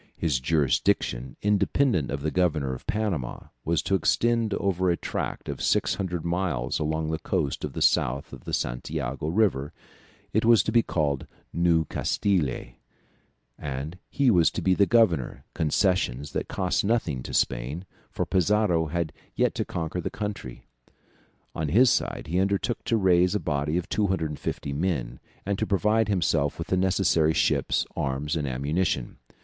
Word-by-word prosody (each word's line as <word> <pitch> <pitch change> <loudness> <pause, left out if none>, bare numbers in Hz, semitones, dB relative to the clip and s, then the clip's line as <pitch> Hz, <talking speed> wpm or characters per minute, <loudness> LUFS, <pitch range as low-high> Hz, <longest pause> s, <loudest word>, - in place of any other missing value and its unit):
His 75 -6 0
jurisdiction, 65 -3 0
independent 105 - +2
of 70 0 -4
the 80 - 0
governor 80 -7 +1
of 65 - -9
Panama, 100 - -2
was 85 0 0
to 100 - -1
extend 115 +6 +2
over 95 -2 0
a 85 - +2
tract - - -4
of - - -5
600 90 -4 0
miles 85 -8 -1
along 80 +1 -1
the 80 - -2
coast 80 -5 -1
to - - -2
the - - -3
south 65 +3 +1
of - - -11
the - - -5
Santiago 70 +2 -3
river; 80 -7 +1 0.6
it 110 - +2
was 115 -3 +6
to - - -1
be 115 +1 +5
called 75 -9 -1 0.3
New 85 -1 +3
Castille, 80 -6 -1 0.8
and 70 +6 -5
he 135 -3 +3
was 85 -5 +5
to - - -5
be 95 - +4
the 100 +1 +3
governor; 100 - +2
concessions 75 -4 0
that - - -3
cost 90 -1 0
nothing 100 - 0
to - - -7
Spain, 70 +10 -1 0.2
for - - -2
Pizarro 95 -3 +2
had 85 0 -2 0.2
yet - - +2
to - - -1
conquer 85 +2 -3
the - - -3
country. 105 - -6 0.9
On 80 -2 -2
his 120 - +5
side - - -1
he 85 +4 0
undertook 100 +4 0
to 115 - +2
raise 90 -1 +3
a - - +2
body 75 0 -1
of 90 +1 -3
250 80 -9 -2
men, 70 -7 -2 0.3
and 100 0 -1
to - - 0
provide 105 +3 +2
himself 80 -7 +1
with 80 - -6
the - - +2
necessary 90 -4 +2
ships, - - +1
arms, 70 +3 -2
and 75 -3 -1
ammunition. 70 +1 -1
85 Hz, 160 wpm, -26 LUFS, 75-95 Hz, 0.9 s, was